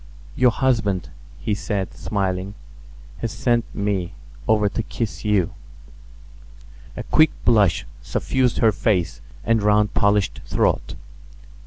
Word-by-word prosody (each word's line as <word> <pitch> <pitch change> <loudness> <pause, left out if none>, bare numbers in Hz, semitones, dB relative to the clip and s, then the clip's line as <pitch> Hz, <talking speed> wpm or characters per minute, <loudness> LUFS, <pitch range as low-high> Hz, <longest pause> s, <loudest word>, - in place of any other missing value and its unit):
"Your 125 -1 +5
husband," 115 -7 0 0.3
he 105 - -1
said, 100 -1 -3
smiling, 95 -1 -2 0.6
"has 115 - -3
sent 120 -2 +1
me 95 -3 -2 0.3
over 105 -1 +3
to 100 - -2
kiss 115 0 -4
you." 105 -5 +1 1.4
A - - -4
quick 155 0 +4 0.2
blush 105 -7 +3 0.2
suffused 130 -3 0
her 110 - +4
face 95 -3 0 0.2
and 115 -1 +3
round 105 0 +3
polished 100 -1 +1
throat. - - 0
105 Hz, 115 wpm, -22 LUFS, 100-115 Hz, 1.4 s, Your